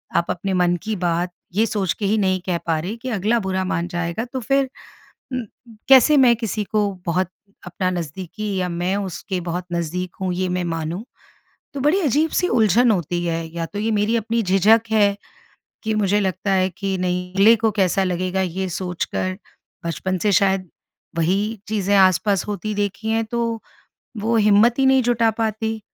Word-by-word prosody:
आप 170 - +3
अपने 190 +2 -3
मन 180 -1 +2
की 220 0 -2
बात, 175 -1 -1 0.2
ये 220 +3 +3
सोच 200 -7 -1
के 205 - -4
ही 210 +3 +2
नहीं 190 -2 +1
कह 180 -2 0
पा 160 -1 +1
रहे 185 +8 -4
कि 255 +3 -6
अगला 220 +1 +1
बुरा 190 -1 -1
मान 170 -2 -1
जाएगा। 175 +4 -3
तो 260 - -1
फिर 275 +3 +1 0.7
म 250 -3 -3 0.4
कैसे 270 +3 +7
मैं 250 -4 +6
किसी 220 -2 -2
को, 210 0 0 0.2
बहुत 180 +1 0 0.4
अपना 185 +1 -2
नज़दीकी 185 +5 -4
या 180 -1 -1
मैं 175 +3 -1
उसके 190 -1 -4
बहुत 175 +1 -4
नज़दीक 175 +2 -3
हूँ, 185 -1 -1
ये 185 0 -1
मैं 180 0 -1
मानूँ? 165 +2 -3 0.7
तो 280 - -4
बड़ी 300 +7 +3
अजीब-सी 310 +4 +1
उलझन 225 - +4
होती 175 -2 -1
है 165 -1 -1
या 165 -1 -2
तो 205 - -6
ये 220 +2 0
मेरी 210 +2 +1
अपनी 230 +1 -1
झिझक 195 +4 +4
है, 205 -2 +3 0.7
कि 220 -1 -1
मुझे 205 -1 +2
लगता 190 0 -1
है 185 -1 +3
अगले 190 +2 +2
को 220 0 +1
कैसा 195 -2 +1
लगेगा 185 +1 -1
ये 190 +1 -2
सोच 180 0 -3
कर? 185 0 -3 0.5
बचपन 185 +3 -2
से 205 +3 +1
शायद, 190 -1 +2 0.5
वही 200 +6 0
चीज़ें 205 -2 +1
आसपास 195 +1 +3
होती 210 +1 -3
देखी 205 +2 -2
हैं, 225 0 +1
तो 230 0 -2 0.6
वो 230 +2 +1
हिम्मत 215 +3 +4
ही 270 - +3
नहीं 265 0 +5
जुटा 235 -1 +2
पाती। 220 0 -2
195 Hz, 180 wpm, -21 LUFS, 180-220 Hz, 0.7 s, कैसे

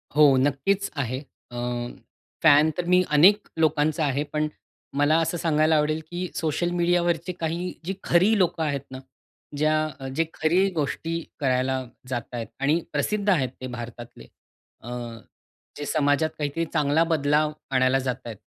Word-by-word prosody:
हो 150 -3 +7
नक्कीच 145 +9 +1
आहे. 130 -3 -2 0.3
अ, - - -9 0.9
फॅन 150 +1 +6
तर 180 - -1
मी 180 +1 +5
अनेक 185 +8 +5
लोकांचा 155 0 +2
आहे, 140 +1 0
पण 155 0 +1 0.5
मला 145 +2 +4
असं 165 +2 -1
सांगायला 155 -1 +2
आवडेल, 155 +1 +1
की 175 +1 -3
सोशल 165 +2 0
मीडियावरचे 175 -1 +1
काही 170 +2 -2
जी 190 - -2
खरी 195 +6 +4
लोकं 175 -3 +1
आहेत 140 -3 -1
ना, 130 - -7 0.6
ज्या 155 -2 0
जे 165 - +2
खरी 180 +5 +2
गोष्टी 165 +2 -2 0.2
करायला 130 -1 +1 0.3
जात 125 -2 -1
आहेत 115 -3 -4
आणि 145 +5 +2
प्रसिद्ध 205 +8 0
आहेत 145 -10 +2
ते 130 - -4
भारतातले. 120 0 -9 0.5
अ, 120 - -9 0.9
जे 145 - -5
समाजात 145 +1 +2
काहीतरी 150 +3 -2
चांगला 150 0 +3
बदलाव 150 -2 +2 0.2
आणायला 130 0 +3
जात 130 -2 -1
आहेत. 115 -3 -7
155 Hz, 145 wpm, -25 LUFS, 140-170 Hz, 0.9 s, हो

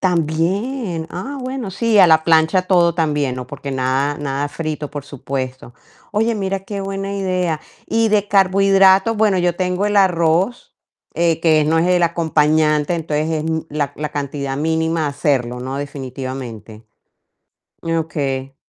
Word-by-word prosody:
También 175 - -1
Ah, 275 +11 -6
bueno, 255 -5 -4
sí, 220 +2 +1
a 180 - +8
la 160 -1 +5
plancha 160 +2 +4
todo 175 -2 +3
también, 150 -6 0
¿no? 125 -1 -6
Porque 140 +1 -7
nada, 135 +2 0
nada 145 0 -2
frito, 155 -1 -5
por 145 -1 -6
supuesto. 130 -3 -6 0.4
Oye, 225 +2 +1
mira 195 -1 -2
qué 200 +1 -6
buena 195 0 -4
idea. 185 -5 -1 0.3
Y 225 0 +1
de 210 -1 +1
carbohidratos, 195 +2 +4
bueno, 210 -3 +2
yo 175 -1 +1
tengo 185 +2 0
el 210 0 0
arroz, 180 +3 +2 0.4
eh, 165 -1 +1
que 155 -2 +3
no 160 +2 +2
es 170 - +2
el 180 -1 +3
acompañante, 155 -2 +2
entonces, 155 -1 -2
es 155 -1 -1 0.3
la 145 -1 -2
la 150 -1 -4
cantidad 140 -1 -4
mínima 160 +1 0
hacerlo, 130 -4 -1
¿no? 130 +2 -4
Definitivamente. 130 -6 -7 1.0
Okey. 145 -5 -2
160 Hz, 145 wpm, -19 LUFS, 145-190 Hz, 1.0 s, a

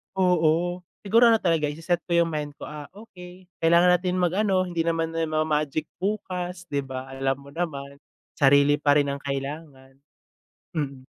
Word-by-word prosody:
oo. 175 -1 +2 0.2
Siguro 230 +4 +5
ano 230 - +6
talaga, 165 -7 +1
ise-set 165 +4 -1
ko 170 - +1
yung 165 - -4
mind 150 -1 -4
ko, - - -12
ah, 150 -1 -8
okey 185 -4 -13 0.2
kailangan 170 +2 +5
natin 180 0 -2
mag-ano, 185 +1 +1
hindi 170 -2 -2
naman 165 -1 0
na 165 0 -1
ma-magic 155 -1 0 0.2
bukas, 180 -3 -3
'di 140 - 0
ba. 130 -1 -6
Alam 135 0 -1
mo 140 - -13
naman, 140 -4 -5 0.4
sarili 140 +1 +5
pa 145 -1 +3
rin 145 -1 +2
ang 140 - -5
kailangan. 135 -1 -6 0.7
Mm. 140 -5 -4
160 Hz, 160 wpm, -25 LUFS, 140-180 Hz, 0.7 s, ano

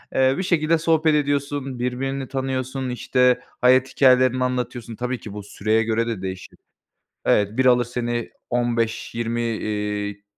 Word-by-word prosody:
Eee, 130 0 +4
bir 190 - -1
şekilde 165 -2 +2
sohbet 160 -1 +2
ediyorsun, 140 -2 -1
birbirini 130 +2 -2
tanıyorsun, 130 -1 -3
işte 125 0 +2 0.2
hayat 130 +1 +5
hikâyelerini 130 -1 +4
anlatıyorsun. 125 -2 -3
Tabii 125 +2 -3
ki 105 - -9
bu 105 -1 -7
süreye 110 +2 0
göre 115 +1 0
de 110 -5 -3
değişir. 95 -1 -7 0.7
Evet, 105 +3 +2
biri 130 -1 +5
alır 125 -1 +3
seni 120 -1 -3 0.2
15-20 115 -1 -1
iii, 105 -2 -3
125 Hz, 140 wpm, -22 LUFS, 115-130 Hz, 0.7 s, hayat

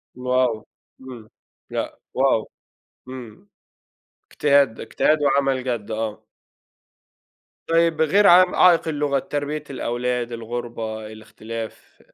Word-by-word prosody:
wow! 125 -3 0 0.4
إمم 125 -4 -11 0.4
لأ، - - -4 0.2
wow! 130 -4 +2 0.6
إمم 120 -5 -10 0.8
اجتهاد 140 -5 +3
ده، - - -8
اجتهاد 155 - +2
وعمل 135 -2 +1
جد، 120 -4 -3
آه. 110 -1 -4 1.4
طيب 165 -1 +2
غير 200 +7 +4
ع 180 0 +6
عائق 175 -2 +5
اللغة، 145 -3 0
تربية 145 +2 -4
الأولاد، 125 -2 -2
الغربة، 115 -2 -5
الاختلاف. 110 +1 -9
125 Hz, 100 wpm, -22 LUFS, 115-145 Hz, 1.4 s, ع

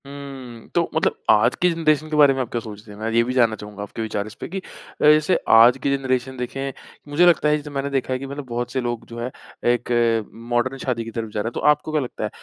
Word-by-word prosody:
हुँ, 135 -4 -9
तो - - +2
मतलब - - +1
आज 105 -1 +5
की 180 - +5
जनरेशन 155 -2 +1
के 155 - -2
बारे 145 -2 +7
में 135 - -4
आप 125 - -4
क्या 120 - -1
सोचते 105 -1 -10
हैं? 105 - -11
मैं 110 +1 -2
ये 115 +1 +4
भी 125 +2 -3
जानना 120 -4 +3
चाहूँगा 105 -1 -8
आपके 105 +3 -7
विचार 105 -2 -3
इसपे 110 - -8
कि 190 - -5
अ, - - -3 0.4
जैसे 155 +4 +5 0.2
आज 120 +3 +7
की 140 0 +2
जनरेशन 130 -1 -2
देखें, 135 +2 -4 0.4
मुझे 165 +5 +4
लगता 170 -3 +4
है 150 - +3
जैसे 150 0 -8
मैंने 140 0 -3
देखा 135 -2 -1
है 130 - -2
कि 135 - -6
मतलब 140 +1 -6
बहुत 120 +1 -3
से 130 - -1
लोग 120 -1 -3
जो 115 0 -8
है 120 +2 -4 0.4
एक 120 0 -4 0.6
मॉडर्न 125 +3 +1
शादी 120 -3 -1
की 115 - -8
तरफ 115 -1 -4
जा 105 - -3
रहे 110 - -3
हैं। 120 - -4
तो - - -3
आपको 150 +1 +1
क्या 155 -1 +1
लगता 125 -4 -6
है? 105 - -1
130 Hz, 265 wpm, -22 LUFS, 115-140 Hz, 0.6 s, बारे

